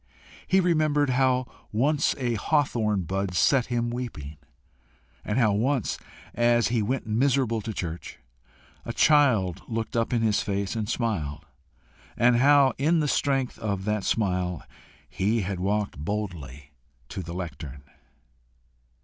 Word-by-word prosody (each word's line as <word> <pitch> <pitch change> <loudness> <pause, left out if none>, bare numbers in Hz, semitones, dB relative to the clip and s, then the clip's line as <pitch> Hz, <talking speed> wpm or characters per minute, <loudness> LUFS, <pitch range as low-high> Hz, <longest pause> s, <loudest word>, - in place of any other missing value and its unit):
He 190 - +4
remembered 155 -5 +2
how 130 0 +2 0.3
once 140 +7 +1
a 125 -3 -1
hawthorn 110 - +1
bud 95 +1 -3
set 130 +6 +3
him 120 -1 -1
weeping; 90 - -6 0.9
and 105 - -2
how 115 -5 +4
once, 120 +3 0 0.3
as 120 0 +3
he 115 -2 +1
went 130 +5 -2
miserable 120 0 +1
to 110 - -5
church, 85 -4 -6 0.7
a 115 - -5
child 120 - +3
looked 115 0 -4
up 115 -1 0
in 120 -2 +1
his 110 -2 +2
face 100 0 -2
and 110 -2 -3
smiled, 80 - -2 0.7
and 120 0 +4
how 140 0 +5
in 160 +4 +3
the 150 - +1
strength 135 -3 0
of 100 -3 -3
that 105 -1 -1
smile 90 -5 -1 0.4
he 105 +4 0
had 95 -1 -3
walked 100 -3 -1
boldly 75 -7 -5 0.4
to 95 - -5
the 85 -1 -7
lectern. 75 -6 -7
110 Hz, 135 wpm, -26 LUFS, 95-130 Hz, 0.9 s, how